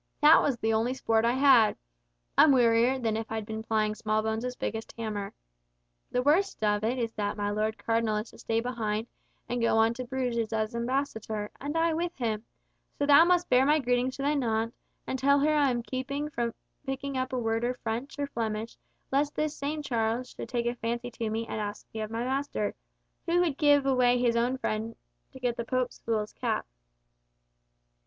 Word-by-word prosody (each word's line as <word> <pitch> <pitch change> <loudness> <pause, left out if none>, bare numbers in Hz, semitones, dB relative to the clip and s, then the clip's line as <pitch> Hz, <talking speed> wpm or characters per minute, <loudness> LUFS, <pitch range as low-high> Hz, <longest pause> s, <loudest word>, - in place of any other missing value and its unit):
That 300 +2 +8
was 275 -4 0
the 225 -1 0
only 230 +4 +1
sport 225 -3 +1
I 235 - +3
had! 260 -5 +5 0.6
I'm 310 - +7
wearier 240 0 +4
than 225 -4 -1
if 225 0 -4
I'd 220 -1 -3
been 220 +1 -5
plying 215 -1 0
Smallbones' 220 +3 -1
biggest 225 -1 -4
hammer. 210 -3 -4 0.8
The 250 - 0
worst 340 - +2
of 210 0 +2
it 235 +4 0
is 230 -2 -2
that 205 0 -2
my 205 0 -1
Lord 215 +1 -1
Cardinal 225 -1 0
is 215 +2 -5
to - - -16
stay 225 0 0
behind 225 -3 -2 0.4
and 245 0 -2
go 230 -1 +3
on 225 +1 +4
to 255 +2 -5
Bruges 245 -3 -2
as 220 0 -1
ambassador, 235 -4 -2
and 290 +4 -2
I 330 0 +2
with 340 +2 -2
him, 220 -4 -2 0.5
so 285 - +1
thou 290 +3 +7
must 355 0 +3
bear 250 +1 +5
my 295 +3 +4
greetings 250 -1 0
to 275 - -5
thy 290 +2 +2
naunt, 230 -4 0 0.3
and 260 - -3
tell 280 +2 +4
her 305 +2 +3
I'm 270 -5 +2
keeping 280 +4 -3
from 235 -3 -2 0.3
picking 275 0 -4
up 255 0 -1
a 255 - -1
word 225 -1 0
of 250 +1 -1
French 235 +6 -4
or 285 - -1
Flemish 225 -4 -4 0.3
lest 285 +2 +1
this 305 0 -1
same 300 +2 -3
Charles 235 0 -1
should - - -8
take 240 -2 -1
a 240 - +1
fancy 235 +1 -3
to 225 -2 -3
me 225 +1 -2
and 220 - -4
ask 205 0 -5
me 220 - -4
of 215 - -4
my 230 +1 -3
master, 265 -5 -1 0.5
who 340 +1 +3
would 330 -6 +1
give 290 -1 +4
away 250 -2 +4
his 240 -1 +2
own 245 +3 +1
head 220 +1 -2 0.4
to 260 - -12
get 245 -1 -1
the 235 - -2
Pope's 250 +1 -2
fool's 215 -2 -2
cap." - - -2
240 Hz, 200 wpm, -28 LUFS, 220-270 Hz, 0.8 s, That